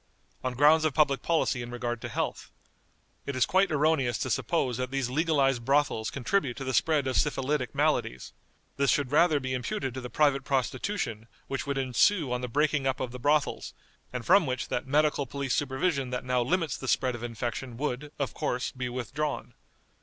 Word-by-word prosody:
On 130 -1 -2
grounds 150 +4 +5
of 155 -4 0
public 140 -3 +3
policy 160 -6 +1
in 120 - -6
regard 120 -1 -3
to - - -5
health. - - -3 0.8
It 140 - -3
is 130 - +3
quite 190 0 +2
erroneous 150 -5 +2
to - - -2
suppose 130 -8 0
that 130 0 -2
these 135 -2 -2
legalized 140 -5 +2
brothels 135 -4 +1
contribute 140 -1 -1
to 135 - -5
the 130 0 -3
spread 150 +1 +2
of 130 -1 0
syphilitic 140 -3 0
maladies. 65 0 0 0.4
This 140 -1 +2
should 140 -3 +1
rather 155 0 +4
be 130 -1 -3
imputed 125 +1 -3
to 130 - -5
the 125 - -6
private 140 -2 +2
prostitution 130 - -2 0.2
which 135 0 -4
would 140 -1 -1
ensue 135 +4 +2
on 125 - -2
the 125 - -3
breaking 145 +2 +1
up 130 - 0
of 130 -2 -3
the 125 - -8
brothels, 145 +3 0 0.4
and 125 -2 -5
from 185 -3 +5
which 130 -1 -3
that 125 - -2
medical 145 0 +2
police 140 0 -2
supervision 140 0 0
that 125 0 -4
now 125 -1 +1
limits 160 +2 0
the 130 - -7
spread 130 0 +1
of 120 - -7
infection 120 +1 -4
would, 145 +1 -3
of 135 -5 -2
course, 125 +1 -2
be 125 -1 -4
withdrawn. 130 +2 -3
135 Hz, 190 wpm, -28 LUFS, 125-150 Hz, 0.8 s, grounds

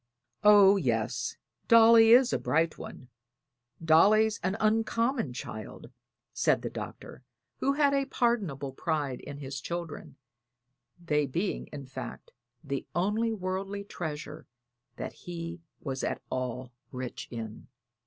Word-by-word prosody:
"Oh, 205 -1 +7
yes, 120 - -1 0.3
Dolly 230 0 +7
is 245 0 +6
a - - +1
bright 160 +1 0
one. 130 - -10 0.8
Dolly's 210 +7 +5
an 190 +3 -1
uncommon 225 - +1
child," 110 -3 -8 0.4
said - - +2
the - - -3
Doctor, - - -8 0.4
who 275 - +2
had 285 -1 +3
a 275 -1 +2
pardonable 195 - -1
pride 145 -3 -2
in 145 -1 -8
his 135 -1 -6
children 170 -2 -6 0.8
they 150 -4 0
being, 175 +9 -2
in 140 -2 -8
fact, 130 - -8 0.3
the 140 -2 -4
only 210 +6 +1
worldly 195 0 -3
treasure 155 -5 -6 0.5
that - - -6
he 170 -1 -7 0.2
was 135 -2 -4
at - - -1
all 130 0 -3 0.2
rich 125 -1 -6
in. 110 -3 -7
170 Hz, 125 wpm, -29 LUFS, 135-215 Hz, 0.8 s, Oh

